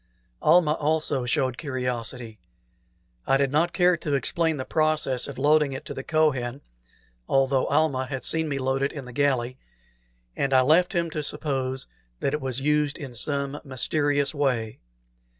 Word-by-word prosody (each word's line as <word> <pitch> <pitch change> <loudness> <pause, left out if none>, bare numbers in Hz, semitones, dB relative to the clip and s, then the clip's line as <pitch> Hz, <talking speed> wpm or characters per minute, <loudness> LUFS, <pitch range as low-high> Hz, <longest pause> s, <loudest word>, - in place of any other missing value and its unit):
Almah 165 -4 +5
also 150 -4 0
showed 130 -1 0
curiosity. 125 -5 -4 0.9
I 135 - +4
did 135 -1 +1
not 165 +4 +2
care 180 -1 +3
to 150 -4 -2
explain 160 +4 0
the 130 - -4
process 155 -5 +1
of 140 - -8
loading 150 -1 +3
it 135 - -7
to - - -5
the - - -5
Kohen, 135 -4 0 0.7
though 135 -1 +2
Almah 140 -4 +1
had 135 -1 -5
seen 160 -1 0
me 140 - -1
load 135 0 -1
it 140 - +1
in 140 -4 -7
the 125 - -10
galley, 130 -2 0 0.8
and 135 -1 0
I 130 - +6
left 160 +7 +3
him 170 -1 0
to 155 - -3
suppose 135 -3 -3 0.3
that 135 - -1
it 150 - -1
was 130 -1 -2
used 150 0 +1
in 135 -4 -8
some 140 +3 -2
mysterious 145 +2 0
way. 125 -7 -1
140 Hz, 165 wpm, -25 LUFS, 130-150 Hz, 0.9 s, I